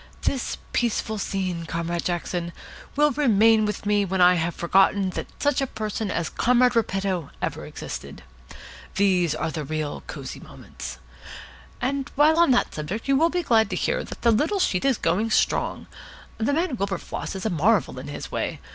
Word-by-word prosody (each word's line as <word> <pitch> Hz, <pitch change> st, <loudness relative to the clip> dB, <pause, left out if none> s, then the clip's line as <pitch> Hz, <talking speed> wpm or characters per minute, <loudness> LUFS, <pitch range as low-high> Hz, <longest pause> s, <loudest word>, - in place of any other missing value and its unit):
This 265 Hz, -3 st, -1 dB, 0.2 s
peaceful 220 Hz, -2 st, 0 dB
scene, 185 Hz, -4 st, -2 dB
Comrade 170 Hz, +1 st, -2 dB
Jackson, 175 Hz, -1 st, -2 dB, 0.4 s
will 295 Hz, +1 st, +4 dB
remain 225 Hz, -5 st, +4 dB
with 210 Hz, 0 st, -4 dB
me 205 Hz, 0 st, +3 dB
when 190 Hz, -1 st, -2 dB
I 180 Hz, 0 st, +7 dB
have 170 Hz, 0 st, -1 dB
forgotten 190 Hz, +2 st, +3 dB
that -, -, -5 dB
such 290 Hz, -1 st, +1 dB
a 270 Hz, -, 0 dB
person 215 Hz, -2 st, -3 dB
as 170 Hz, -3 st, -1 dB
Comrade 250 Hz, +4 st, +3 dB
Repetto 195 Hz, -7 st, 0 dB
ever -, -, -4 dB
existed. -, -, -7 dB, 0.7 s
These 180 Hz, -5 st, +2 dB
are 160 Hz, +1 st, -2 dB
the 155 Hz, -1 st, -4 dB
real 155 Hz, 0 st, -3 dB
Cosy -, -, -7 dB
Moments. -, -, -9 dB, 0.8 s
And 275 Hz, +2 st, -2 dB
while 305 Hz, +3 st, +5 dB
on 340 Hz, -, +5 dB
that 245 Hz, -1 st, +2 dB
subject 180 Hz, -, -4 dB
you 275 Hz, -, +4 dB
will 325 Hz, +5 st, +4 dB
be 355 Hz, +1 st, -1 dB
glad 225 Hz, -7 st, +3 dB
to 185 Hz, -, -2 dB
hear -, -, 0 dB
that -, -, -10 dB
the 235 Hz, -, +5 dB
little 300 Hz, -, +2 dB
sheet 185 Hz, -, +1 dB
is 270 Hz, -4 st, +3 dB
going 195 Hz, +7 st, +1 dB
strong. -, -, +1 dB, 0.5 s
The 225 Hz, +5 st, +1 dB
man 320 Hz, -4 st, 0 dB
Wilberfloss 195 Hz, -1 st, -3 dB
is 190 Hz, -, -5 dB
a 220 Hz, -, +1 dB
marvel 175 Hz, -, +2 dB
in 135 Hz, -, -8 dB
his 145 Hz, -, -7 dB
way. -, -, -2 dB
205 Hz, 175 wpm, -24 LUFS, 175-245 Hz, 0.8 s, I